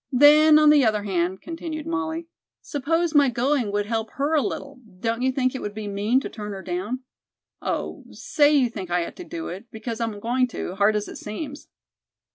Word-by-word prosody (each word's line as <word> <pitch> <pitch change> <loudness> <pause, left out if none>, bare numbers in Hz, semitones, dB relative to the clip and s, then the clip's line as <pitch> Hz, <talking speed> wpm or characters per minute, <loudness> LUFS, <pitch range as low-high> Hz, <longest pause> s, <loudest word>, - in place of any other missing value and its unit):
"Then, 300 +3 +7
on 305 -1 +7
the 295 -2 +6
other 215 -3 +2
hand," 185 -1 -1
continued 325 -2 -5
Molly, 335 -1 -2 0.4
"suppose 325 +4 0
my 285 -3 +5
going 245 -1 0
would 205 0 0
help 225 0 -2
her 285 +3 -1
a 305 - +4
little, 280 -1 -5 0.2
don't 230 +3 -1
you 260 +1 +2
think 255 -1 0
it 265 - -5
would 205 0 -5
be 215 -1 -5
mean 205 +5 +1
to - - -4
turn 210 -2 -7
her 190 -1 -7
down? 190 +8 -3 0.6
Oh, - - -3
say 290 -1 +2
you 280 -4 +4
think 190 -6 -7
I 175 -1 +1
ought - - -9
to 360 - -7
do 335 -1 -6
it, 190 +6 -8
because 225 +1 -5
I'm 225 -3 -2
going 250 +4 +1
to, 225 - -5
hard 200 +2 +3
as 210 0 -1
it - - -8
seems." 275 +7 -7
250 Hz, 210 wpm, -24 LUFS, 210-295 Hz, 0.6 s, Then